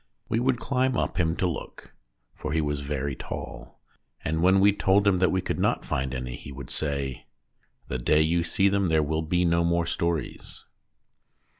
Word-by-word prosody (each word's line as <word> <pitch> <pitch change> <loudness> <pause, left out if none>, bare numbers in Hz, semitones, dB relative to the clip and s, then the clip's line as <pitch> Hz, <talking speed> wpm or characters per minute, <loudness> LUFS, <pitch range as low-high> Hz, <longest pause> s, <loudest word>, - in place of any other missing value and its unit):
We 115 - +1
would 125 +1 +2
climb 130 0 0
up - - -1
him 80 -1 +1
to 95 - 0
look 85 - -7 0.4
(for 75 - -5
he 80 - +2
was 75 -2 -1
very 70 -1 -3
tall), - - -8 0.5
and 80 +1 0
when 95 +2 +5
we 100 +1 +5
told 100 0 +3
him 95 -2 +4
that 90 -2 +4
we 95 +3 +1
could - - -2
not - - +1
find 65 0 -2
any 65 -1 -4
he 70 - -10
would 65 -2 -9
say: 70 -4 -3 0.6
"The 65 - -3
day 75 +5 +3
you 85 +2 +1
see 95 +3 +2
them 100 -1 +2
there 80 -2 +3
will 80 +2 -1
be 90 +3 +1
no 85 0 +3
more 85 0 +1
stories." 85 -1 -3
85 Hz, 190 wpm, -26 LUFS, 70-95 Hz, 0.6 s, when